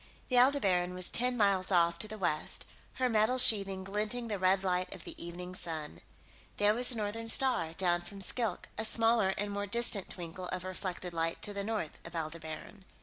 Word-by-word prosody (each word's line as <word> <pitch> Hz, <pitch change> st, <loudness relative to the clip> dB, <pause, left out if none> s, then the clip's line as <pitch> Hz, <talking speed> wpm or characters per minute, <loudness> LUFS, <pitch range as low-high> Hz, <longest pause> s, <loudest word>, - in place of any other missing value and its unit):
The 250 Hz, -2 st, +4 dB
Aldebaran 195 Hz, -10 st, +2 dB
was 185 Hz, -1 st, -3 dB
ten 250 Hz, +1 st, 0 dB
miles 195 Hz, -4 st, +2 dB
off, 170 Hz, -2 st, +3 dB
to 215 Hz, -, -1 dB
the 215 Hz, +1 st, -8 dB
west, 155 Hz, -6 st, 0 dB, 0.3 s
her 260 Hz, -1 st, 0 dB
metal 225 Hz, +2 st, +2 dB
sheathing 195 Hz, -6 st, +4 dB
glinting 210 Hz, +5 st, -2 dB
in -, -, -6 dB
the 205 Hz, -2 st, -2 dB
red 190 Hz, +1 st, +2 dB
light 185 Hz, 0 st, -1 dB
of 185 Hz, -, -12 dB
the -, -, -8 dB
evening 180 Hz, +1 st, -7 dB
sun. 160 Hz, -4 st, -6 dB, 0.6 s
There 205 Hz, +1 st, +4 dB
was 245 Hz, +2 st, +2 dB
the 250 Hz, -, +3 dB
Northern 220 Hz, +1 st, -4 dB
Star, 225 Hz, -9 st, +2 dB
down 175 Hz, -1 st, +1 dB
from 200 Hz, +3 st, -10 dB
Skilk, 225 Hz, +4 st, -2 dB
a -, -, 0 dB
smaller 225 Hz, -3 st, +4 dB
and 205 Hz, 0 st, -2 dB
more 205 Hz, 0 st, -3 dB
distant 215 Hz, -2 st, +3 dB
twinkle 180 Hz, +1 st, -7 dB
of 185 Hz, 0 st, -3 dB
reflected 185 Hz, -1 st, -5 dB
light 165 Hz, 0 st, -2 dB
to 205 Hz, -, +2 dB
the 200 Hz, 0 st, -3 dB
north 210 Hz, -7 st, -4 dB
of 170 Hz, 0 st, -10 dB
Aldebaran. 160 Hz, +4 st, -6 dB
195 Hz, 200 wpm, -32 LUFS, 180-220 Hz, 0.6 s, The